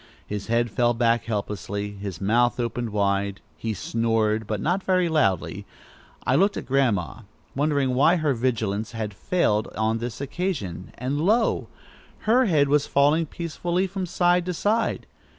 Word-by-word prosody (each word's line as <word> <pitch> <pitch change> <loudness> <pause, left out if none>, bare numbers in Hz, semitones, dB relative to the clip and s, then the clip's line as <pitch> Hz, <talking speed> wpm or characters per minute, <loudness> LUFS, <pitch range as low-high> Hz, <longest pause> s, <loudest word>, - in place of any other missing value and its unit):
His 105 -1 -5
head 115 0 +1
fell 120 0 +2
back 115 0 +2
helplessly, 105 -1 -3
his 100 -4 -7
mouth 120 +5 +2
opened 120 0 -2
wide. 100 -1 0 0.2
He 110 -1 -3
snored, 110 -1 0
but 105 -1 -2
not 175 - 0
very 185 -2 +2
loudly. 135 - 0 0.6
I - - +2
looked 200 +3 +3
at - - -5
Grandma, 120 - +1 0.4
wondering 140 -2 +1
why 145 +7 +4
her 155 -5 +1
vigilance 115 -3 -1
had 110 -2 -4
failed 105 - 0
on 110 +1 0
this 120 0 -5
occasion, 135 - -4
and 135 +4 -2
lo! 220 +7 +2 0.5
her 245 +4 +4
head 150 -8 +3
was 145 +1 +2
falling 150 +4 +3
peacefully 175 +3 -2
from 190 -1 -4
side 175 +1 +2
to 180 - -2
side. 220 +5 0
120 Hz, 150 wpm, -24 LUFS, 105-165 Hz, 0.6 s, why